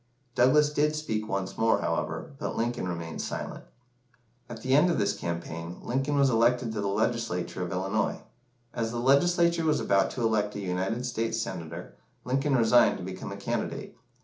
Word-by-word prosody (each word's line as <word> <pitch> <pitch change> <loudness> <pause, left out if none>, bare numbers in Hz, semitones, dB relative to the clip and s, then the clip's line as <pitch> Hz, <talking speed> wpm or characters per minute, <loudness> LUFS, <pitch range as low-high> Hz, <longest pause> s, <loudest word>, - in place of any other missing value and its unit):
Douglas 145 +5 +4
did 150 +1 +2
speak 110 -8 -2
once 95 -1 -3
more, 115 0 +3
however, 80 - -2
but - - -3
Lincoln 120 -4 -1
remained 85 -2 -4
silent. - - -5 0.9
At 110 -2 -8
the 130 - +1
end 150 +6 +5
of 170 - +1
this 100 0 +1
campaign, 85 0 -5
Lincoln 135 +4 -1
was 140 -1 +4
elected 120 +1 +2
to 110 -2 -3
the 100 - -1
Legislature 100 -4 -1
of 90 -1 -3
Illinois. 95 +4 -1 0.5
As 115 -2 -1
the 120 - -4
Legislature 170 +6 +3
was 155 -1 +2
about 100 -1 +2
to 125 - -4
elect 105 -2 +1
a - - -3
United 95 +6 -2
States 115 -2 -1
Senator, 85 -5 -6 0.3
Lincoln 135 +2 +1
resigned 120 +1 +5
to - - -7
become 95 0 -6
a - - -6
candidate. - - -3
115 Hz, 175 wpm, -28 LUFS, 95-130 Hz, 0.9 s, end